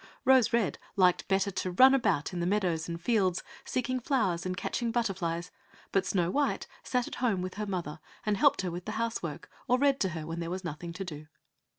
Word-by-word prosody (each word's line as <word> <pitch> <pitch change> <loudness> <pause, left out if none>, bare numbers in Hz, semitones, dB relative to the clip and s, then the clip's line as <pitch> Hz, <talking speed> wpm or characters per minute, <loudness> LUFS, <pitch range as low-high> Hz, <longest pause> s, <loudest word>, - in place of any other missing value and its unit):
Rose 260 -3 +5
red 225 - +1 0.2
liked 180 -2 +3
better 195 +1 +2
to 185 0 -2
run 260 +9 +7
about 200 - +1
in 175 - -3
the 175 - 0
meadows 180 -5 0
and 170 0 -4
fields 185 -2 +1 0.2
seeking 255 0 -1
flowers 200 -10 0
and 185 0 -3
catching 235 +4 -1
butterflies; 180 -7 -1 0.4
but 195 -1 +1
Snow 180 -3 +1
white 290 +4 0 0.2
sat 250 -1 -1
at - - -6
home 210 -8 +1
with 185 - -4
her 210 0 -4
mother, 170 -5 -4 0.3
and 210 -1 +2
helped 195 - +4
her 180 - -2
with 175 +3 -6
her 215 - -2
house 230 0 -1
work, - - -6 0.2
or 250 0 +4
read 275 0 +3
to 190 - +1
her 160 -3 -5
when 165 +1 -4
there 170 -1 -3
was 185 +2 -4
nothing 170 +1 -5
to 190 +3 -5
do. 155 -3 -8
190 Hz, 220 wpm, -30 LUFS, 175-230 Hz, 0.4 s, run